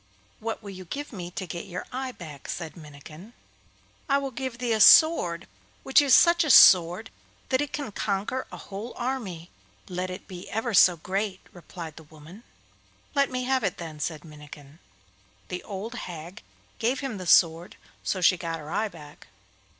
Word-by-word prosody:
'What 225 Hz, 0 st, -5 dB
will 200 Hz, -, -8 dB
you 185 Hz, -1 st, -10 dB
give 285 Hz, -, -6 dB
me 175 Hz, -4 st, -6 dB
to 185 Hz, +1 st, -6 dB
get 170 Hz, 0 st, -7 dB
your 180 Hz, -, -6 dB
eye 260 Hz, 0 st, -4 dB
back?' 155 Hz, -, -11 dB
said 165 Hz, -3 st, -5 dB
Minnikin. 155 Hz, -, -13 dB, 0.8 s
'I 275 Hz, -, +4 dB
will 275 Hz, -1 st, -3 dB
give 260 Hz, -1 st, -5 dB
thee 245 Hz, -2 st, -1 dB
a 220 Hz, -, 0 dB
sword 185 Hz, -, +6 dB, 0.4 s
which 270 Hz, +3 st, +5 dB
is 275 Hz, -3 st, +5 dB
such 340 Hz, 0 st, +5 dB
a 310 Hz, -, -2 dB
sword 180 Hz, -1 st, +7 dB, 0.4 s
that 260 Hz, 0 st, +2 dB
it 290 Hz, -, -3 dB
can 285 Hz, -7 st, -4 dB
conquer 205 Hz, +6 st, -2 dB
a -, -, -8 dB
whole 205 Hz, +5 st, -8 dB
army, 225 Hz, -10 st, -4 dB, 0.4 s
let 180 Hz, 0 st, -4 dB
it 185 Hz, -, -8 dB
be 180 Hz, -1 st, -9 dB
ever 225 Hz, +2 st, -2 dB
so 180 Hz, -2 st, +6 dB
great,' 190 Hz, +3 st, -3 dB
replied 170 Hz, -3 st, -10 dB
the -, -, -10 dB
woman. 160 Hz, +7 st, -14 dB, 0.7 s
'Let 280 Hz, -1 st, +2 dB
me 255 Hz, 0 st, -3 dB
have 260 Hz, -1 st, 0 dB
it, 195 Hz, -, -1 dB
then,' 160 Hz, -3 st, -8 dB
said 155 Hz, +1 st, -4 dB
Minnikin. 150 Hz, -1 st, -13 dB, 0.7 s
The 180 Hz, -, -4 dB
old 205 Hz, +3 st, -7 dB
hag 175 Hz, -3 st, -8 dB, 0.4 s
gave 245 Hz, +5 st, 0 dB
him 255 Hz, -8 st, -4 dB
the 185 Hz, -, -7 dB
sword, 165 Hz, 0 st, +4 dB, 0.3 s
so 185 Hz, -, -2 dB
she 180 Hz, +1 st, +5 dB
got 165 Hz, -2 st, -4 dB
her 155 Hz, 0 st, -10 dB
eye 220 Hz, -, 0 dB
back. 150 Hz, -5 st, -14 dB
185 Hz, 180 wpm, -26 LUFS, 170-245 Hz, 0.8 s, sword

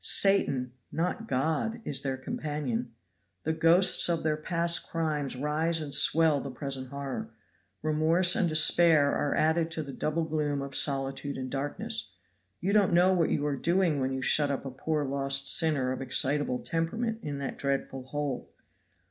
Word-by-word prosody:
Satan 140 Hz, -11 st, +3 dB, 0.2 s
not 180 Hz, +7 st, -3 dB
God 160 Hz, -, -1 dB
is 135 Hz, -1 st, -1 dB
their 135 Hz, -1 st, -3 dB
companion. 130 Hz, -4 st, -4 dB, 0.5 s
The 160 Hz, -, -1 dB
ghosts 170 Hz, +3 st, +5 dB
of 170 Hz, -1 st, -1 dB
their 155 Hz, -1 st, 0 dB
past 170 Hz, +2 st, +1 dB
crimes 155 Hz, -5 st, -2 dB
rise 155 Hz, +5 st, 0 dB
and 150 Hz, -3 st, -5 dB
swell 155 Hz, -1 st, +4 dB
the 140 Hz, -, -7 dB
present 135 Hz, 0 st, -5 dB
horror. 140 Hz, -1 st, -6 dB, 0.5 s
Remorse 160 Hz, +4 st, +3 dB
and 175 Hz, -, +1 dB
despair 155 Hz, -1 st, +4 dB
are 145 Hz, -, -1 dB
added 160 Hz, +1 st, +1 dB
to 160 Hz, -1 st, -4 dB
the 140 Hz, -2 st, -9 dB
double 155 Hz, +4 st, -2 dB
gloom 150 Hz, -2 st, -2 dB
of 140 Hz, 0 st, -8 dB
solitude 135 Hz, 0 st, 0 dB
and 130 Hz, -1 st, -6 dB
darkness. 145 Hz, -, -4 dB, 0.4 s
You 195 Hz, +3 st, -2 dB
don't 200 Hz, -4 st, +3 dB
know 180 Hz, +2 st, +4 dB
what 170 Hz, -3 st, +1 dB
you 145 Hz, -, -1 dB
are 145 Hz, -1 st, -1 dB
doing 170 Hz, 0 st, 0 dB
when 130 Hz, 0 st, -1 dB
you 130 Hz, 0 st, -4 dB
shut 145 Hz, +1 st, +3 dB
up 140 Hz, 0 st, -4 dB
a 135 Hz, -, -5 dB
poor 150 Hz, +3 st, -3 dB
lost 135 Hz, 0 st, 0 dB
sinner 145 Hz, -6 st, +3 dB
of 130 Hz, -, -5 dB
excitable 135 Hz, 0 st, +1 dB
temperament 220 Hz, -, -3 dB
in 145 Hz, -5 st, -5 dB
that 140 Hz, -1 st, -6 dB
dreadful 135 Hz, -1 st, -3 dB
hole. 145 Hz, -1 st, -5 dB
150 Hz, 165 wpm, -28 LUFS, 135-165 Hz, 0.5 s, ghosts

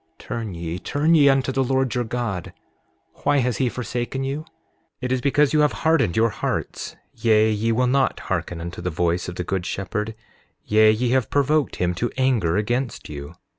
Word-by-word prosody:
Turn 110 Hz, -6 st, -5 dB
ye, 85 Hz, +1 st, -4 dB
turn 150 Hz, -, +1 dB
ye 145 Hz, -3 st, +6 dB
unto 135 Hz, -1 st, +2 dB
the 135 Hz, +1 st, +1 dB
Lord 130 Hz, -1 st, +1 dB
your 125 Hz, -1 st, 0 dB
God. 110 Hz, -6 st, -3 dB, 0.7 s
Why 145 Hz, 0 st, +2 dB
has 125 Hz, -5 st, +1 dB
he 125 Hz, -, +1 dB
forsaken 125 Hz, +3 st, -3 dB
you? 135 Hz, +2 st, -2 dB
7:18 155 Hz, -, -10 dB, 0.6 s
It 125 Hz, -1 st, -2 dB
is 130 Hz, -1 st, +1 dB
because 145 Hz, +1 st, +3 dB
you 155 Hz, -, +4 dB
have 150 Hz, 0 st, +3 dB
hardened 155 Hz, -, +3 dB
your 115 Hz, 0 st, +3 dB
hearts; -, -, -3 dB, 0.2 s
yea, 110 Hz, -1 st, +3 dB
ye 110 Hz, +2 st, 0 dB
will 125 Hz, +3 st, +2 dB
not 135 Hz, +2 st, +1 dB
hearken 90 Hz, -, -3 dB
unto 85 Hz, +1 st, -6 dB
the 90 Hz, -, -2 dB
voice 85 Hz, +1 st, 0 dB
of 90 Hz, -, -7 dB
the 90 Hz, -, -3 dB
good 95 Hz, +1 st, -2 dB
shepherd; 105 Hz, +4 st, -3 dB, 0.5 s
yea, 110 Hz, +1 st, +5 dB
ye 120 Hz, +3 st, 0 dB
have 130 Hz, -4 st, +2 dB
provoked 145 Hz, +1 st, +1 dB
him 90 Hz, 0 st, 0 dB
to 115 Hz, +7 st, -1 dB
anger 120 Hz, -10 st, +2 dB
against 120 Hz, +3 st, -2 dB
you. 70 Hz, +2 st, -8 dB
120 Hz, 195 wpm, -23 LUFS, 95-135 Hz, 0.7 s, ye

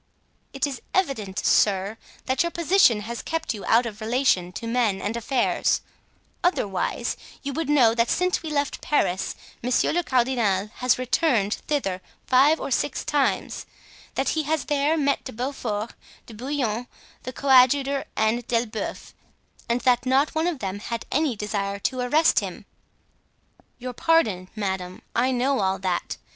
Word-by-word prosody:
"It 275 Hz, 0 st, -1 dB
is 275 Hz, -4 st, -5 dB
evident, 260 Hz, -, 0 dB
sir, 200 Hz, +1 st, +3 dB, 0.3 s
that 260 Hz, 0 st, +1 dB
your 340 Hz, -, +1 dB
position 340 Hz, -, +3 dB
has 235 Hz, +3 st, -5 dB
kept 325 Hz, -3 st, -2 dB
you 205 Hz, -, -8 dB
out 235 Hz, +2 st, +4 dB
of 220 Hz, -1 st, -7 dB
relation 220 Hz, -6 st, +1 dB
to 230 Hz, -, -6 dB
men 230 Hz, -4 st, +1 dB
and 205 Hz, +4 st, -3 dB
affairs; 240 Hz, +2 st, +1 dB, 0.6 s
otherwise 205 Hz, -, 0 dB, 0.3 s
you 280 Hz, 0 st, -3 dB
would 320 Hz, +1 st, -3 dB
know 255 Hz, -7 st, +5 dB
that 230 Hz, 0 st, +1 dB
since 365 Hz, 0 st, +1 dB
we 320 Hz, -, -5 dB
left 285 Hz, -2 st, -1 dB
Paris 190 Hz, -11 st, 0 dB, 0.3 s
monsieur 250 Hz, +1 st, +1 dB
le 350 Hz, -, +1 dB
cardinal 235 Hz, -, +1 dB
has 250 Hz, 0 st, +2 dB
returned 250 Hz, -5 st, +1 dB
thither 195 Hz, -12 st, -1 dB, 0.2 s
five 280 Hz, +5 st, +4 dB
or -, -, -5 dB
six 260 Hz, -, -1 dB
times; 290 Hz, -2 st, 0 dB, 0.5 s
that 270 Hz, -, 0 dB
he 315 Hz, -, +1 dB
has 310 Hz, -1 st, -1 dB
there 295 Hz, +2 st, +1 dB
met 280 Hz, -2 st, +1 dB
De 260 Hz, -, -7 dB
Beaufort, 235 Hz, -3 st, -3 dB, 0.3 s
De 230 Hz, -, -12 dB
Bouillon, 245 Hz, -1 st, -2 dB, 0.3 s
the 255 Hz, -, -6 dB
coadjutor 270 Hz, +1 st, +4 dB
and 220 Hz, +2 st, 0 dB
D'Elbeuf 230 Hz, -2 st, -3 dB, 0.6 s
and 235 Hz, +1 st, +1 dB
that 250 Hz, 0 st, +2 dB
not 270 Hz, +3 st, +3 dB
one 320 Hz, +2 st, 0 dB
of 350 Hz, -4 st, -1 dB
them 200 Hz, -4 st, -4 dB
had 230 Hz, +1 st, -5 dB
any 295 Hz, -3 st, +1 dB
desire 200 Hz, -1 st, -2 dB
to 255 Hz, +6 st, -2 dB
arrest 295 Hz, +6 st, +3 dB
him." -, -, -7 dB, 1.1 s
"Your 250 Hz, 0 st, -6 dB
pardon, 220 Hz, -, +2 dB
madame, 190 Hz, -3 st, -4 dB
I 250 Hz, +2 st, +3 dB
know 260 Hz, +1 st, +1 dB
all 190 Hz, -1 st, +1 dB
that. 185 Hz, -2 st, -2 dB
250 Hz, 155 wpm, -24 LUFS, 215-280 Hz, 1.1 s, know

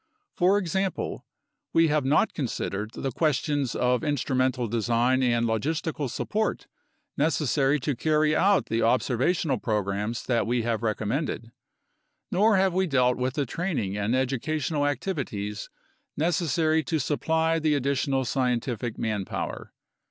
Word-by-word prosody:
For 190 Hz, +3 st, +4 dB
example, 190 Hz, 0 st, -2 dB, 0.5 s
we 165 Hz, -1 st, +4 dB
have 150 Hz, -1 st, +2 dB
not 145 Hz, +10 st, +3 dB
considered 110 Hz, -6 st, -3 dB
the 135 Hz, -, -3 dB
questions 145 Hz, -2 st, 0 dB
of 125 Hz, +2 st, +1 dB
instrumental 130 Hz, -4 st, 0 dB
design 120 Hz, +3 st, +1 dB
and 120 Hz, -2 st, +2 dB
logistical 145 Hz, +5 st, -1 dB
support 215 Hz, -, -2 dB, 0.5 s
necessary 145 Hz, -1 st, +2 dB
to 140 Hz, +1 st, -1 dB
carry 155 Hz, +3 st, +2 dB
out 195 Hz, +4 st, +3 dB
the 115 Hz, +1 st, -1 dB
observational 130 Hz, +5 st, +1 dB
programs 105 Hz, +1 st, -2 dB
that 120 Hz, -3 st, 0 dB
we 120 Hz, 0 st, +1 dB
have 115 Hz, -1 st, -1 dB
recommended, 115 Hz, +2 st, -2 dB, 0.8 s
nor 210 Hz, +3 st, +4 dB
have 190 Hz, -1 st, +2 dB
we 190 Hz, +1 st, +1 dB
dealt 125 Hz, -4 st, +3 dB
with 130 Hz, +1 st, -1 dB
the 145 Hz, -, 0 dB
training 140 Hz, -, -2 dB
and 105 Hz, +4 st, 0 dB
educational 145 Hz, +3 st, 0 dB
activities 125 Hz, -, -3 dB, 0.5 s
necessary 160 Hz, -1 st, +1 dB
to 165 Hz, -, 0 dB
supply 160 Hz, +3 st, +1 dB
the 155 Hz, -1 st, +2 dB
additional 135 Hz, -1 st, 0 dB
scientific 120 Hz, -2 st, -1 dB
manpower. 105 Hz, -4 st, -3 dB
135 Hz, 125 wpm, -26 LUFS, 120-160 Hz, 0.8 s, For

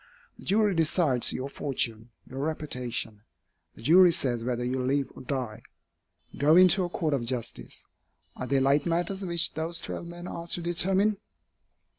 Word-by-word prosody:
The -, -, -13 dB
jury 210 Hz, 0 st, +2 dB
decides 160 Hz, -6 st, +2 dB
your 130 Hz, -, -4 dB
fortune, 120 Hz, -5 st, -3 dB, 0.2 s
your 130 Hz, -, -8 dB
reputation. 125 Hz, -8 st, -3 dB, 0.5 s
The -, -, -14 dB
jury 175 Hz, +6 st, +7 dB
says 120 Hz, -7 st, +1 dB
whether 120 Hz, 0 st, -2 dB
you 130 Hz, +1 st, -1 dB
live 135 Hz, +2 st, 0 dB
or -, -, -10 dB
die. 125 Hz, -4 st, -4 dB, 0.8 s
Go 150 Hz, +3 st, +5 dB
into 185 Hz, +1 st, +6 dB
a 175 Hz, -, -3 dB
court 160 Hz, -3 st, -1 dB
of 135 Hz, -4 st, 0 dB
justice. 120 Hz, -1 st, -5 dB, 0.5 s
Are 130 Hz, -, -5 dB
they 135 Hz, +1 st, +2 dB
light 140 Hz, +4 st, +2 dB
matters 175 Hz, +4 st, -1 dB
which 170 Hz, -2 st, +2 dB
those 165 Hz, +1 st, -1 dB
twelve 170 Hz, -, -5 dB
men 175 Hz, +1 st, -9 dB
are 170 Hz, -1 st, -7 dB
to 175 Hz, -, -2 dB
determine? 190 Hz, +4 st, +1 dB
150 Hz, 160 wpm, -27 LUFS, 125-175 Hz, 0.8 s, jury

